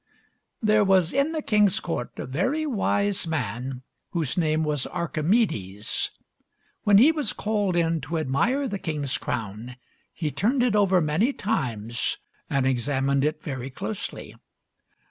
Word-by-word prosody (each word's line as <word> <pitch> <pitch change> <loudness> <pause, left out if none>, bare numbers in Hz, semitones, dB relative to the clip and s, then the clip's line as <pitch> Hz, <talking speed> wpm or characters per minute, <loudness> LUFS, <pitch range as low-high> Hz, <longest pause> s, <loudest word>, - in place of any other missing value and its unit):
There 215 0 +4
was 190 -4 +3
in 280 +4 +2
the 315 -2 -3
king's 210 -3 +4
court 165 -8 -4
a - - -4
very 255 - 0
wise 205 - 0
man 130 -3 -3 0.3
whose 160 -7 -1
name 155 -2 +1
was 150 -3 0
Archimedes. 155 - 0 0.7
When 205 -1 +5
he 265 +9 +7
was 305 -3 -1
called 205 -4 0
in 165 -2 +1
to 155 +5 -3
admire 235 - +1
the 200 -4 -4
king's 150 -6 -2
crown 110 +3 -4 0.4
he 155 -3 -3
turned 245 - +1
it 240 -4 +2
over 190 -3 +4
many 160 - +2
times 120 - -1 0.3
and 140 -2 +1
examined 135 +2 +1
it 155 +1 -1
very 130 -3 -4
closely. 190 +10 -6
165 Hz, 140 wpm, -25 LUFS, 135-210 Hz, 0.7 s, he